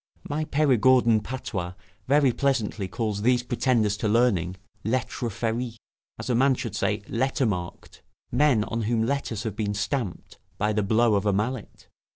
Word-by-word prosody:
My 155 +2 -2
Perigordin 130 -5 +4
patois 100 -7 -5 0.3
very 140 -1 +4
pleasantly 115 -8 0
calls 105 +1 -2
these 125 +2 +3
pretenders 120 -4 +1
to 110 - -1
learning, 105 -6 +2 0.3
'lettre 120 +1 -1
ferits', 115 +3 -2 0.4
as - - -6
a 125 - +1
man 130 +3 +4
should 115 -4 -5
say, 105 0 -1
letter 130 +3 0
marked 90 -5 -4 0.3
men 140 -8 +3
on 115 +2 -3
whom 110 +1 +1
letters 120 -5 -2
have 110 -3 -4
been 105 -2 -2
stamped 110 -1 -3 0.2
by 105 +2 +1
the 105 - +1
blow 110 +3 +3
of 100 0 +1
a 100 - +3
mallet. 110 +3 -3
115 Hz, 160 wpm, -26 LUFS, 105-130 Hz, 0.4 s, Perigordin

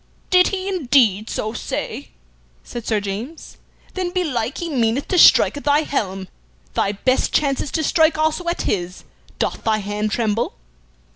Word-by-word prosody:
"Did 365 0 +6
he 385 -1 -3
indeed 250 - +2
so 215 +1 -3
say?" - - -5 0.5
said 240 -2 -8
Sir 215 -2 +1
James. 210 +10 -7 0.4
"Then 370 -2 -2
belike 290 - -2
he 345 - -4
meaneth 250 -3 0
to 365 - +2
strike - - +7
at 285 - -7
thy 290 +1 +3
helm. 195 -10 -3 0.5
Thy 200 - 0
best 255 +6 +1
chance 275 -3 +1
is - - -4
to 315 - 0
strike 315 +1 +3
also 315 +3 0
at 345 - -1
his. 180 -2 -3 0.3
Doth - - -2
thy 220 -1 +2
hand 210 +1 -2
tremble?" 225 0 -1
255 Hz, 160 wpm, -20 LUFS, 215-315 Hz, 0.5 s, strike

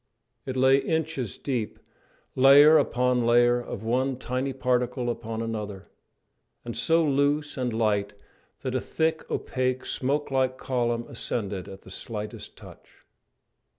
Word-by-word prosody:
It 130 0 -3
lay 130 +1 +5
inches 155 - -2
deep, 125 -6 -3 0.6
layer 145 +4 +8
upon 125 0 +1
layer 120 +1 +4
of 110 - -7
one 130 +3 0
tiny 130 +2 -2
particle 125 -1 0
upon 115 -1 -5
another, 105 -4 -6 0.7
and 120 - -5
so 165 +7 +3
loose 145 +1 +1
and 125 -2 -2
light 105 -3 0 0.5
that - - -2
a - - 0
thick, 160 0 -1
opaque, 130 0 -2
smoke 140 +2 -1
like 130 -1 +1
column 120 -3 -1
ascended 100 -5 -4
at 95 0 -11
the 95 - -12
slightest 105 +1 -7
touch. - - -15
125 Hz, 130 wpm, -26 LUFS, 115-135 Hz, 0.7 s, layer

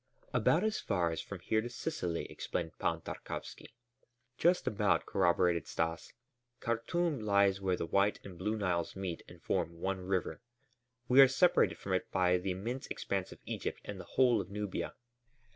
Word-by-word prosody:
"About - - +3
as 215 0 0
far 90 -5 0
as 80 - -3
from - - -8
here 110 0 +1
to 120 - -5
Sicily," 120 - -3
explained 80 -1 -4
Pan 85 0 0
Tarkowski. 110 - -7 0.6
"Just 175 +1 +3
about," 100 -5 +2
corroborated 90 -2 +2
Stas. 80 0 -2 0.5
"Khartûm 145 +5 0
lies 100 -2 +3
where 95 -2 +1
the - - -2
White 100 +4 +2
and 95 -2 -8
Blue 105 +5 -2
Niles 90 -5 -1
meet 95 -3 -4
and - - -13
form 85 0 -1
one 95 +1 -1
river. 90 -4 -2 0.7
We 130 +2 +8
are 135 - +10
separated 155 +7 +3
from 95 - -4
it 95 - 0
by 90 -1 +3
the 95 +2 -3
immense 115 +9 -3
expanse 95 -2 -3
of - - -10
Egypt - - -4
and - - -6
the - - -8
whole 125 -3 +5
of - - -9
Nubia." 105 -1 -4
95 Hz, 170 wpm, -33 LUFS, 90-115 Hz, 0.7 s, are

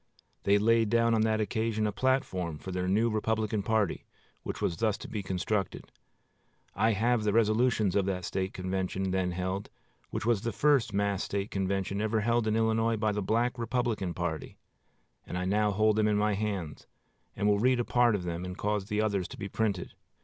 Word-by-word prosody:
They 100 +1 +5
laid 115 +1 +3
down 115 +1 +3
on 110 - +3
that 110 0 +2
occasion 110 +1 0
a 105 - 0
platform 100 - 0
for 95 - -7
their 90 0 -2
new 105 +5 +3
Republican 110 0 0
party, 105 -2 0 0.3
which - - -5
was 85 - -1
thus 110 -2 +1
to - - -9
be 105 - -4
constructed. 95 +1 -2 0.8
I 110 +2 +2
have 115 +2 +1
the 105 -1 +1
resolutions 110 -2 +2
of 100 -2 +2
the 95 -2 -1
State 95 +2 -2
convention 95 0 -2
then 95 -1 0
held, 95 +3 -3 0.4
which - - -4
was 115 -4 +2
the 115 0 -2
first 135 -1 +2
mass 100 -1 0
State 100 +1 -3
convention 95 +1 -1
ever 110 0 +1
held 115 +1 +1
in 110 - +1
Illinois 115 0 +2
by 110 0 +1
the 105 0 -2
Black 120 +5 0
Republican 115 -6 -1
party; 85 -3 -4 0.7
and 90 - -5
I 90 - -2
now 105 +2 +2
hold 110 +1 +2
them 110 -1 +3
in 105 -1 +2
my 105 0 +2
hands 100 -7 -3 0.5
and 105 - 0
will 100 -1 +3
read 125 +2 +3
a 120 - 0
part 120 -2 +3
of 95 - -3
them, 85 0 -4
and 90 0 -6
cause 105 -1 -1
the 105 +1 -1
others 100 -4 0
to - - -10
be 100 -2 -5
printed. 100 -3 -2
105 Hz, 200 wpm, -29 LUFS, 95-110 Hz, 0.8 s, They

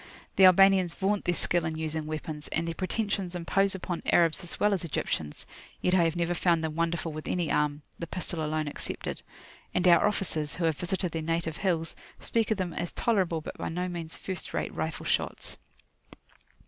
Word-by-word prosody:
The 190 - +7
Albanians 185 -1 +6
vaunt 200 +1 0
their 175 - +2
skill 175 0 +3
in 160 -1 -2
using 160 -1 -2
weapons, 155 -1 -5
and 165 - -1
their 165 - -1
pretensions 190 0 -2
impose 195 +3 +2
upon 180 -2 -4
Arabs 165 0 +4
as 175 - -7
well 210 0 +4
as 185 - -1
Egyptians; 80 - -3 0.3
yet 180 - +1
I 175 -2 +5
have 165 0 0
never 175 0 0
found 170 -2 +2
them 160 -1 -2
wonderful 170 0 -1
with 155 0 -6
any 175 -4 0
arm 150 0 +1 0.2
[p.134](the 170 - -5
pistol 175 -3 -2
alone 155 0 -1
excepted); 145 - -4 0.5
and 180 0 +3
our 175 +3 +7
officers, 160 -7 -1
who 180 - -3
have 160 -3 +1
visited 180 0 -1
their 160 - -2
native 165 0 -1
hills, 170 -4 0 0.2
speak 225 -2 0
of 220 - +1
them 180 -3 -2
as 175 - -3
tolerable 185 -8 +1
but - - -8
by - - -2
no 180 +3 -2
means 170 -2 -5
first 185 -2 -4
rate - - -2
rifle - - -3
shots. - - -1
170 Hz, 195 wpm, -29 LUFS, 160-185 Hz, 0.5 s, The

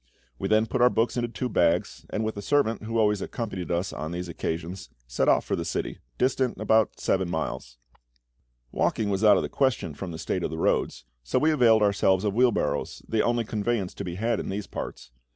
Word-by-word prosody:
We - - -1
then 110 +1 +3
put 120 +2 -2
our 125 - +7
books 115 -1 0
into 120 -1 0
two 125 +2 -3
bags, 85 -6 +1
and 110 - -2
with 110 - -2
a 100 - -5
servant 115 -1 +1
who 115 +1 -2
always 105 -2 +2
accompanied 100 -7 -4
us 85 +2 -1
on 80 +1 -5
these 90 +1 -4
occasions, 85 +2 -4 0.2
set - - +1
off - - +3
for - - 0
the - - -3
city, - - -3 0.2
distant 130 -1 +1
about 110 -1 +2
seven 95 -2 0
miles. 75 -7 -4 0.9
Walking 105 -2 0
was 95 +2 -1
out 105 -2 +7
of - - 0
the - - -2
question, 130 - 0
from 90 +5 -6
the 80 - -6
state 85 +2 -2
of - - -1
the 80 - -5
roads, 75 - 0 0.2
so 60 - -1
we 155 +1 +3
availed 115 -7 +5
ourselves 100 -2 +3
of 105 -2 0
wheel 125 +2 +4
barrows, - - -2
the 110 -1 +1
only 120 -1 +1
conveyance 105 -2 -1
to - - -6
be 85 -1 -5
had 115 +3 0
in - - -4
these 100 +1 -3
parts. 60 - -7
105 Hz, 220 wpm, -26 LUFS, 90-115 Hz, 0.9 s, our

